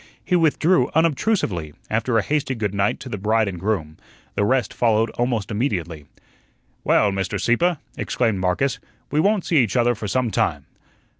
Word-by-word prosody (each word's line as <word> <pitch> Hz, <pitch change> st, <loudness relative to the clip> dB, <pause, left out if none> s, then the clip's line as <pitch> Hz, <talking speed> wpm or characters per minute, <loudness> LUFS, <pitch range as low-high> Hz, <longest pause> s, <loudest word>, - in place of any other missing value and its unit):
He 180 Hz, -, +1 dB
withdrew 170 Hz, +2 st, +3 dB
unobtrusively, 150 Hz, -, 0 dB
after 115 Hz, +2 st, 0 dB
a 110 Hz, -, +2 dB
hasty 145 Hz, -3 st, -1 dB
good 105 Hz, -4 st, -2 dB
night 100 Hz, 0 st, 0 dB
to -, -, -8 dB
the 105 Hz, -5 st, -5 dB
bride 110 Hz, +2 st, +2 dB
and 90 Hz, -3 st, -5 dB
groom. 85 Hz, -6 st, -2 dB, 0.4 s
The -, -, 0 dB
rest 125 Hz, 0 st, +1 dB
followed 115 Hz, -1 st, +2 dB
almost 120 Hz, -4 st, -2 dB
immediately. 90 Hz, -, -2 dB, 0.8 s
"Well, 105 Hz, -2 st, +3 dB
Mr. 95 Hz, +1 st, -2 dB
Sieppe," 165 Hz, -, +2 dB, 0.2 s
exclaimed 110 Hz, -6 st, 0 dB
Marcus, 95 Hz, +9 st, 0 dB, 0.3 s
"we 150 Hz, -, +1 dB
won't 200 Hz, +2 st, +2 dB
see 165 Hz, -, +1 dB
each 115 Hz, -7 st, +2 dB
other 120 Hz, 0 st, +3 dB
for 110 Hz, -2 st, -6 dB
some 125 Hz, +2 st, 0 dB
time." -, -, 0 dB
115 Hz, 165 wpm, -22 LUFS, 100-135 Hz, 0.8 s, withdrew